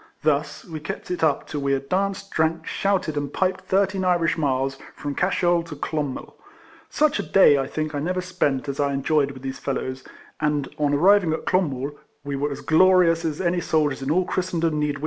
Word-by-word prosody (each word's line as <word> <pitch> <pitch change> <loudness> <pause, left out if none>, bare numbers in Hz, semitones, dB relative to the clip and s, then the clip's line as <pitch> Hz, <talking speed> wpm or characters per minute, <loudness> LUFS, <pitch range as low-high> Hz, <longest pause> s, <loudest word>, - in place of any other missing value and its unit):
Thus 150 -1 0
we 160 -2 -7
kept 150 +3 -6
it 180 - -2
up 150 -3 +2
till 145 - -5
we 140 0 +1
had 135 0 -2
danced, 195 +2 -1
drank, 160 +1 0
shouted, 190 -5 -1
and 145 -1 -2
piped 185 0 -1
thirteen 190 0 +1
Irish 175 -2 +2
miles, 135 -3 -1 0.2
from 145 -1 -4
Cashel 175 0 +2
to 165 -2 -9
Clonmel. 145 -2 -4 0.6
Such 300 -1 +2
a - - +2
day, 150 -7 +5
I 135 - -1
think, 155 0 -3
I 145 - -2
never 180 +5 -1
spent, 175 -7 -1
as 140 0 -4
I 140 -1 +1
enjoyed 140 +1 +1
with 135 -2 -10
these 135 0 -5
fellows; 130 -1 -3 0.4
and 150 -2 0
on 145 -1 +2
arriving 180 +1 +4
at 160 - -4
Clonmel, 145 -7 0 0.3
we 140 0 -4
were 145 +2 -1
as 140 - -6
glorious 175 0 +4
as 155 -3 -2
any 175 -1 0
soldiers 150 -5 0
in 135 - -3
all 180 +4 +2
Christendom 170 -5 -1
need 150 - +1
wish 145 - -1
to - - -7
be. - - -12
155 Hz, 210 wpm, -23 LUFS, 140-180 Hz, 0.6 s, day